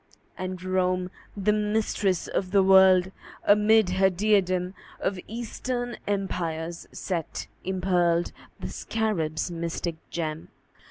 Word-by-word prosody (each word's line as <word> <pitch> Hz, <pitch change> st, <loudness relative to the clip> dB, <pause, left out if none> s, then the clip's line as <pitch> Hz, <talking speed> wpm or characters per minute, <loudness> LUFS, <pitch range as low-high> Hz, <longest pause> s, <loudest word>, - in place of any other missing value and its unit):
And 185 Hz, -1 st, -5 dB
Rome, 185 Hz, -1 st, 0 dB, 0.3 s
the 205 Hz, +1 st, +2 dB
Mistress 210 Hz, -3 st, 0 dB
of 185 Hz, -, -2 dB
the 195 Hz, 0 st, +4 dB
World, 190 Hz, -1 st, +6 dB, 0.3 s
Amid 210 Hz, 0 st, +5 dB
her 190 Hz, +1 st, +4 dB
diadem 185 Hz, -2 st, +1 dB, 0.3 s
Of 190 Hz, -2 st, -1 dB
Eastern 240 Hz, +2 st, -4 dB
Empires 170 Hz, -4 st, -2 dB
set 170 Hz, -5 st, -4 dB, 0.2 s
impearled 180 Hz, -2 st, +1 dB, 0.3 s
The -, -, -5 dB
Scarab's 175 Hz, -8 st, -2 dB
mystic 170 Hz, 0 st, -3 dB
gem. 160 Hz, -2 st, -4 dB
185 Hz, 105 wpm, -26 LUFS, 175-205 Hz, 0.3 s, World